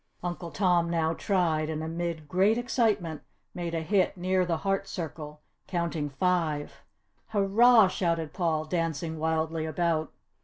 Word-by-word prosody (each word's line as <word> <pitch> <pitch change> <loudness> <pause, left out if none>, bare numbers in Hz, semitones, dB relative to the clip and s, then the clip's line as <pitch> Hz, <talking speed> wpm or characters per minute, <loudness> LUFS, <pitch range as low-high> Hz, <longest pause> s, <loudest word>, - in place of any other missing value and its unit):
Uncle 175 -1 -4
Tom 175 -2 +2
now 165 -1 +1
tried 165 -4 0
and 155 0 -3
amid 165 -1 -4
great 195 +7 +3
excitement 215 - 0 0.3
made 170 -1 -4
a 165 - -1
hit 190 +2 +1
near 185 0 +1
the 165 -2 0
heart 195 +2 -1
circle, 150 -4 -6 0.3
counting 170 -4 -2
five. 150 -2 -1 0.5
"Hurrah!" 220 +2 +5
shouted 170 -4 -1
Paul, 160 -4 0
dancing 160 -1 -2
wildly 160 0 -1
about. 160 0 0
170 Hz, 130 wpm, -28 LUFS, 160-185 Hz, 0.5 s, Hurrah